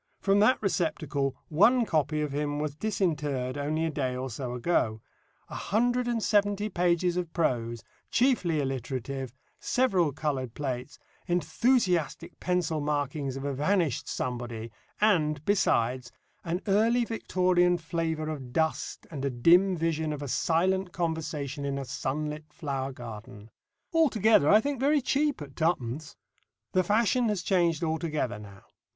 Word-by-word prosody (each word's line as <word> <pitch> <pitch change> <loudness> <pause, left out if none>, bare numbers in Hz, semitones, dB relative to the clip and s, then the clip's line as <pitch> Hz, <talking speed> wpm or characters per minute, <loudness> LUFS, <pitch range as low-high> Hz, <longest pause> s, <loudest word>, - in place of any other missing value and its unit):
From 200 0 +3
that 215 +5 +4
receptacle 150 -7 -1
one 225 +10 +4
copy 155 -3 0
of 150 -2 -2
him 145 +1 -2
was 150 -1 -2
disinterred 150 -9 -1
only 150 +3 -1
a 165 - -1
day 130 -4 -2
or 130 0 -4
so 125 +2 -4
ago; 120 -5 0 0.5
a - - -11
hundred 245 +4 0
and 235 -2 -1
seventy 205 0 +2
pages 175 -1 +1
of 175 -2 -2
prose, 120 - -1 0.3
chiefly 230 - +2
alliterative, 135 -1 -3 0.3
several 190 - +2
coloured 135 -5 -3
plates, 130 -1 -4 0.3
enthusiastic 180 - +1
pencil 175 -3 0
marking 145 0 -1
of 135 - -5
a 140 - -1
vanished 155 0 0
somebody, 120 -2 -4 0.3
and, 155 -8 +2
besides, 125 - +1 0.3
an 175 +2 -2
early 225 +4 +3
Victorian 180 -5 +2
flavour 160 -1 -2
of 140 -5 -5
dust 160 +3 -1
and 140 -4 -5
a 140 - +1
dim 175 +9 +4
vision 160 -1 -1
of 145 -1 -4
a - - -4
silent 180 +6 +1
conversation 160 -4 -3
in 140 -1 -2
a 135 - -4
sunlit 150 +4 -4
flower 135 -4 -3
garden 110 -3 -10 0.4
altogether 220 - +4
I 210 +2 +7
think 280 -1 -2
very 290 +3 +3
cheap 280 - 0
at 140 -1 -12
twopence. 150 -3 -1 0.6
The 185 - +3
fashion 225 +4 +2
has 200 -5 -1
changed 170 -5 +2
altogether 160 -8 -1
now. 100 -2 -12
160 Hz, 140 wpm, -28 LUFS, 135-185 Hz, 0.6 s, I